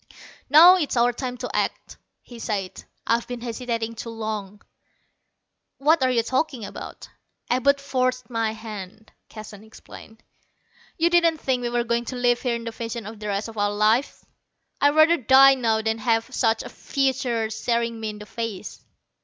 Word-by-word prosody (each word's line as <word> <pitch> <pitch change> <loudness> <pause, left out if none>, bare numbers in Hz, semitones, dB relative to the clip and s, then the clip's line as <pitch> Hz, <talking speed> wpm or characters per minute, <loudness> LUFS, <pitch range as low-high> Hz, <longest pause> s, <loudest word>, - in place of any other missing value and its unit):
"Now 340 +6 +9
is 300 -7 -2
our 240 +1 +3
time 250 0 -5
to 250 0 -6
act," - - -2 0.3
he 240 -2 -12
said. 195 -5 -4 0.2
"I've 230 +1 0
been 245 -1 -6
hesitating 230 -1 -3
too 230 +1 -7
long." 215 -3 -6 1.1
"What 310 +3 +3
are 260 - +3
you 235 -2 +2
talking 260 -2 -2
about?" - - -9 0.4
"Abud 280 +3 +3
forced 255 -3 -1
my 225 -2 -1
hand," 215 -1 -9 0.2
Keston 215 -1 -11
explained. 220 0 -14 0.7
"You 335 +1 +2
didn't 340 -2 +4
think 260 -4 -1
we 240 - -2
were 240 0 0
going 235 0 -1
to 255 - -5
live 245 -1 +1
here 245 -2 0
in 235 - -6
this 230 -1 -7
fashion 230 0 -5 0.2
the 210 - -6
rest 200 +2 -2
of 225 -2 -8
our 205 0 +2
lives? 215 +6 +1 0.6
I'd 285 +1 +4
rather 315 +2 +6
die 270 +2 +7
now 225 -4 0
than 220 0 -1
have 225 +2 0
such 225 -3 +1
a - - -8
future 255 -5 -1
staring 230 +1 -1
me 220 -1 -3
in 210 - -7
the 210 - -10
face. 210 -2 -6
235 Hz, 170 wpm, -24 LUFS, 220-255 Hz, 1.1 s, Now